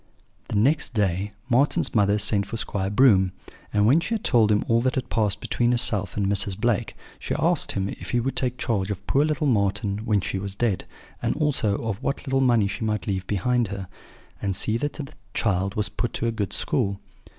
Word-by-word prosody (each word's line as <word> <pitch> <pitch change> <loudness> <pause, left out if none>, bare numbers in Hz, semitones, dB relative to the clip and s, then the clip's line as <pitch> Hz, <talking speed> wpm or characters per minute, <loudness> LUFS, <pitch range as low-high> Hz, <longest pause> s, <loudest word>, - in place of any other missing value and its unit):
"The - - -4
next 130 +4 +2
day 100 -1 0 0.2
Marten's 135 +3 +2
mother 100 -1 +3
sent 105 -1 +2
for 115 - -5
Squire 95 -3 -2
Broom; 100 -5 +4 0.4
and 105 0 +2
when 135 +9 +5
she 220 +7 -2
had 220 - -4
told 110 -3 +3
him 105 - +2
all 115 0 +3
that 130 +4 0
had 130 -2 -3
passed 105 -3 0
between 120 0 0
herself 105 -6 +3
and 100 - +1
Mrs. 100 0 0
Blake, 115 -1 0 0.2
she - - -3
asked - - +1
him 95 0 -1
if - - -7
he 120 - +1
would 130 +2 -2
take 125 -1 -1
charge 100 -4 -1
of 100 -1 -5
poor 140 - +2
little 155 0 0
Marten 100 -4 +1
when 105 -2 +1
she 95 +1 -3
was 100 0 -5
dead, 105 -4 0 0.4
and - - 0
also 135 -9 +1
of 110 -1 -3
what 140 +1 -3
little 135 -1 +1
money 120 -5 +3
she 100 +3 -4
might 105 -1 -1
leave 95 -2 -3
behind 120 +4 +1
her; 95 -1 -6 0.5
and 100 -2 -1
see 110 +3 +1
that 145 +5 -2
the 140 -3 -7 0.2
child 100 -2 0
was 105 -2 0
put 110 +4 -3
to - - -2
a 115 - +1
good 105 -4 -3
school. 100 0 -1
105 Hz, 215 wpm, -24 LUFS, 100-120 Hz, 0.5 s, when